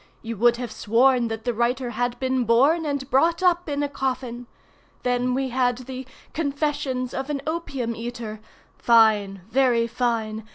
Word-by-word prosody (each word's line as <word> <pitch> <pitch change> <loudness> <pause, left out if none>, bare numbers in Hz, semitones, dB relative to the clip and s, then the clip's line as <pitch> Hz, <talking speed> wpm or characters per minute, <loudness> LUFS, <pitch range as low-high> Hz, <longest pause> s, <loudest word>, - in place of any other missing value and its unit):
You 230 0 -4
would 235 +3 +4
have 245 -2 -5
sworn 235 +3 +3
that 225 0 -5
the 245 - 0
writer 240 +2 0
had 245 0 -2
been 260 -1 0
born 280 +8 +3
and 280 -2 -2
brought 335 +7 +3
up 350 -2 +2
in 290 0 -1
a - - +1
coffin. 255 -3 -4 0.6
Then 250 0 +1
we 265 0 -1
had 245 -1 +1
the 255 0 -8 0.3
'Confessions 285 -4 -2
of 265 +2 -4
an 290 -1 -1
Opium 275 -8 -3
eater'—fine, 220 -2 0
very 240 -1 +3
fine! 225 -2 -2
250 Hz, 155 wpm, -24 LUFS, 230-270 Hz, 0.6 s, would